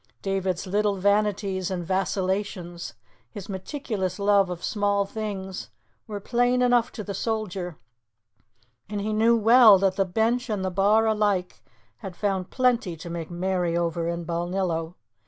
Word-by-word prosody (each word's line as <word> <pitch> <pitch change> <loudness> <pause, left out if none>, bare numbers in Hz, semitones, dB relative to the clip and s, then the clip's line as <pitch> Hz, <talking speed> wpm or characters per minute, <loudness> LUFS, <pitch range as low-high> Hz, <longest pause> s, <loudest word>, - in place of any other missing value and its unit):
David's 190 -2 -1
little 205 +2 +1
vanities 200 -1 +1
and 180 -2 -3
vacillations, 185 - -2 0.3
his 195 - -9
meticulous 195 - -4
love 200 -2 +3
of 180 -1 -6
small 200 -1 +1
things, 195 -3 -5 0.4
were 205 -1 -5
plain 245 +3 +1
enough 245 -1 +3
to 215 - -6
the 200 - -5
soldier, 195 -6 -3 1.1
and 205 -1 -3
he 215 +2 -2
knew 230 +2 +4
well 225 -1 +7
that 190 0 +1
the 195 - +2
bench 230 +6 0
and 200 -3 -1
the 185 - -1
bar 205 +4 +3
alike 205 -4 0 0.4
had 185 +6 -8
found 190 -2 -1
plenty 245 -9 +1
to 170 +2 -8
make 165 -2 -5
merry 175 -1 -1
over 170 -1 -1
in 170 0 -3
Balnillo. 170 -1 -2
195 Hz, 145 wpm, -25 LUFS, 180-215 Hz, 1.1 s, well